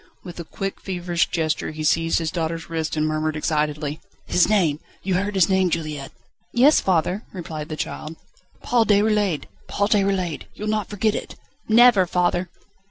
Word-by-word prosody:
With 175 -2 -9
a - - -4
quick, 195 +4 -5
feverish 175 -3 -1
gesture 160 -2 -1
he 155 0 -6
seized 165 +1 +2
his 165 -2 -1
daughter's 165 0 -3
wrist, 160 -1 -2
and 155 - +2
murmured 155 0 -1
excitedly: 150 0 -1 0.2
"His 180 - +3
name. 170 -9 +2 0.2
You 190 - -1
heard 200 +3 -1
his 185 -3 +5
name, 190 -1 +2
Juliette?" 155 -4 -3 0.4
"Yes, 270 +6 +5
father," 180 +2 +1
replied 160 -4 -6
the 155 - -5
child. 155 +1 -5 0.5
"Paul 235 -2 +2
Déroulède! 205 -5 +2 0.2
Paul 205 0 0
Déroulède! 195 -6 +1
You'll 210 +1 -4
not 215 -2 -1
forget 210 +1 0
it?" - - -5 0.3
"Never, 225 -4 +6
father!" 180 +1 0
175 Hz, 165 wpm, -23 LUFS, 155-200 Hz, 0.5 s, Never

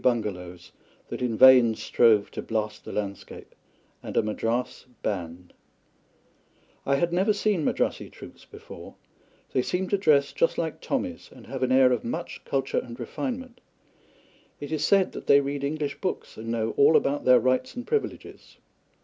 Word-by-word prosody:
bungalows 90 -7 -2 0.4
that - - -6
in 120 -3 -1
vain 125 -3 +7
strove 110 -2 +3
to - - -5
blast 110 -1 -3
the - - -7
landscape, 100 -2 -6 0.5
and - - -6
a - - +4
Madras 115 +4 -3 0.2
band. 90 -3 -5 1.3
I 140 - +3
had 170 +4 0
never 195 +4 +2
seen 205 -5 0
Madrassi - - -1
troops - - -13
before. - - -12 0.6
They 130 - +2
seem 180 +7 -2
to 200 - +1
dress 145 -6 +3
just 165 - +1
like 160 -2 -3
Tommies, - - -3
and - - -15
have - - -6
an 130 0 +1
air 130 -1 +5
of 125 - 0
much 165 +9 -5
culture 135 -1 -1
and 120 0 -9
refinement. 255 -2 -5 1.0
It 145 +1 -7
is 155 -2 -1
said 195 -2 +3
that - - -9
they 140 - +7
read 140 0 -3
English 145 0 -3
books 185 - -4
and 110 +1 -9
know 115 -1 -1
all 150 +3 +6
about 145 +1 -1
their 125 -1 +6
rights 130 - 0
and 245 0 -6
privileges. 440 +5 -4
130 Hz, 165 wpm, -26 LUFS, 110-165 Hz, 1.3 s, vain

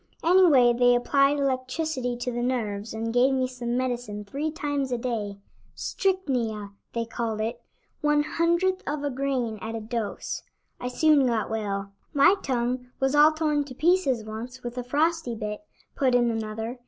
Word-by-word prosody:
Anyway 325 -9 +6
they 245 0 +4
applied 275 +3 +3
electricity 260 -1 -1
to 245 +1 -3
the 240 0 -2
nerves 225 -4 -2
and 225 +1 -3
gave 255 +2 +4
me 260 -1 +1
some 245 -1 -3
medicine 245 -5 -3
three 285 +9 -3
times 290 -4 -2
a 245 - +1
day 220 -5 -3 0.4
'strychnia,' 245 - -1 0.2
they 230 0 -1
called 230 -2 -3
it, 220 +2 -3 0.4
one 295 -1 +3
hundredth 340 +4 +1
of 290 0 -2
a 285 - -1
grain 255 -5 -1
at 225 +1 -4
a - - -3
dose. 220 -1 -4 0.4
I 250 - -4
soon 285 +1 +4
got 225 -3 0
well." 200 -3 -3 0.2
"My 285 +6 +7
tongue 250 -1 -1
was 270 +1 +1
all 295 +1 +7
torn 305 -2 0
to 260 -2 -10
pieces 295 -8 +2
once 235 +4 -7
with 240 0 -5
a - - -3
frosty 300 0 0
bit," 210 +1 -4 0.3
put 260 -3 +2
in 240 -1 +3
another. 225 +2 -4
250 Hz, 165 wpm, -26 LUFS, 230-290 Hz, 0.4 s, My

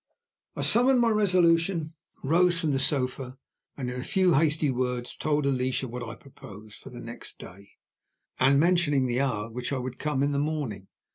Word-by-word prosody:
I - - -4
summoned 250 +2 +4
my 235 -1 +3
resolution, 170 -5 +2 0.3
rose 170 +4 +3
from 160 -3 0
the 135 - 0
sofa, 130 -1 -1 0.4
and 130 -3 -4
in 125 0 -4
a - - -5
few 185 -1 +2
hasty 155 -1 +2
words 125 -1 -2
told 150 -1 -1
Alicia 130 -1 0
what 125 +1 -7
I 115 -1 -6
proposed 110 -5 -13
for - - -12
the 125 - -10
next 120 0 -7
day, 100 +2 -13 0.7
and 135 +2 +4
mentioned 155 -5 +2
the 125 +2 0
hour 110 -7 -1
at 115 - -12
which 125 +2 -2
I 140 - -1
would 125 0 -6
come 150 -3 -1
in 145 - +1
the 140 - 0
morning. 140 -11 -3
140 Hz, 190 wpm, -27 LUFS, 125-165 Hz, 0.7 s, summoned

